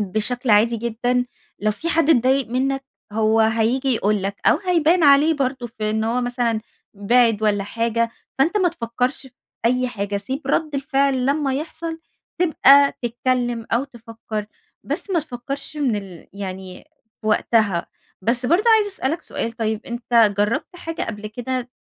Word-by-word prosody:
بشكل 220 Hz, +5 st, -2 dB
عادي 220 Hz, +3 st, +4 dB
جدًا. 245 Hz, +2 st, 0 dB, 0.4 s
لو 215 Hz, -, +2 dB
في 320 Hz, +11 st, -4 dB
حد 330 Hz, -1 st, +2 dB
اتضايق 260 Hz, -1 st, +3 dB
منّك 270 Hz, +3 st, -1 dB, 0.3 s
هو 220 Hz, +1 st, +2 dB
هييجي 225 Hz, +4 st, +1 dB
يقول 210 Hz, -2 st, 0 dB
لك 200 Hz, +1 st, -3 dB
أو -, -, +5 dB
هيبان 350 Hz, -2 st, +2 dB
عليه 290 Hz, +3 st, +6 dB
برضه 260 Hz, -3 st, -2 dB
في 215 Hz, -2 st, -4 dB
إن 220 Hz, 0 st, 0 dB
هو 235 Hz, +3 st, 0 dB
مثلًا 245 Hz, -2 st, -1 dB, 0.3 s
بِعِد 220 Hz, +1 st, +3 dB
والّا 205 Hz, -2 st, +1 dB
حاجة، 230 Hz, +2 st, -1 dB, 0.3 s
فأنت 325 Hz, +9 st, +2 dB
ما 370 Hz, -3 st, +3 dB
تفكّرش 250 Hz, -2 st, -3 dB
في 265 Hz, -, -15 dB, 0.3 s
أي 250 Hz, +2 st, +2 dB
حاجة. 205 Hz, -3 st, -3 dB
سيب 260 Hz, +8 st, -4 dB
رَد 310 Hz, -3 st, 0 dB
الفعل 275 Hz, -2 st, +1 dB
لمّا 280 Hz, -1 st, +1 dB
يحصل، 320 Hz, +3 st, -5 dB, 0.4 s
تبقى 285 Hz, -5 st, +6 dB
تتكلّم 240 Hz, -1 st, -1 dB
أو 235 Hz, +4 st, +2 dB
تفّكر. 225 Hz, -4 st, -7 dB, 0.4 s
بس -, -, -4 dB
ما 345 Hz, -3 st, +2 dB
تفكّرش 275 Hz, +1 st, -7 dB
من 270 Hz, -7 st, +1 dB
ال 190 Hz, -5 st, -9 dB
يعني 190 Hz, -2 st, -7 dB, 0.4 s
في 215 Hz, -, -8 dB
وقتها. 210 Hz, -4 st, +2 dB, 0.4 s
بس 240 Hz, +5 st, 0 dB
برضه 345 Hz, -, +3 dB
عايزة 435 Hz, -2 st, +4 dB
أسألك 315 Hz, +1 st, -2 dB
سؤال 230 Hz, -, -4 dB
طيب، 220 Hz, -1 st, -2 dB
أنت 235 Hz, -2 st, +2 dB
جرّبت 265 Hz, -, -1 dB
حاجة 330 Hz, -2 st, -5 dB
قبل 215 Hz, -1 st, -5 dB
كده 245 Hz, +3 st, -4 dB
245 Hz, 155 wpm, -21 LUFS, 220-275 Hz, 0.4 s, عليه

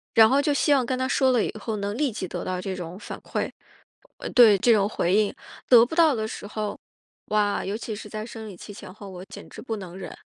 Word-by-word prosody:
然 220 Hz, -1 st, +8 dB
后 275 Hz, +2 st, +3 dB
就 295 Hz, 0 st, +1 dB
希 290 Hz, +1 st, +3 dB
望 260 Hz, -3 st, +3 dB
跟 255 Hz, +1 st, -1 dB
他 260 Hz, 0 st, -1 dB
说 265 Hz, -1 st, +3 dB
了 240 Hz, -4 st, +3 dB
以 -, -, -4 dB
后， 220 Hz, 0 st, -3 dB
能 200 Hz, +1 st, -3 dB
立 290 Hz, -3 st, +1 dB
即 190 Hz, -3 st, -5 dB
得 -, -, -5 dB
到 185 Hz, -1 st, -3 dB
这 190 Hz, 0 st, -4 dB
种 180 Hz, +1 st, -7 dB
反 -, -, -8 dB
馈 -, -, -3 dB, 0.8 s
对， 225 Hz, -5 st, +7 dB
这 235 Hz, +5 st, +3 dB
种 200 Hz, -2 st, +3 dB
回 180 Hz, -4 st, 0 dB
应。 210 Hz, 0 st, +2 dB, 0.4 s
得 240 Hz, -2 st, +8 dB
不 290 Hz, -, -8 dB
到 320 Hz, -5 st, +5 dB
的 220 Hz, -1 st, -2 dB
时 205 Hz, -, -7 dB
候， 210 Hz, -1 st, -4 dB, 0.5 s
哇， 210 Hz, -1 st, +1 dB
尤 200 Hz, +2 st, -3 dB
其 220 Hz, -2 st, -5 dB
是 210 Hz, 0 st, -9 dB
在 215 Hz, +1 st, -5 dB
生 225 Hz, -2 st, -8 dB
理 185 Hz, -, -11 dB
期 205 Hz, -, -10 dB
前 185 Hz, -, -10 dB
后， 200 Hz, 0 st, -11 dB
我 180 Hz, 0 st, -9 dB
简 -, -, -11 dB
直 -, -, -10 dB
不 225 Hz, -4 st, -4 dB
能 185 Hz, -3 st, -9 dB
忍。 -, -, -7 dB
215 Hz, 275 characters per minute, -25 LUFS, 200-245 Hz, 0.8 s, 然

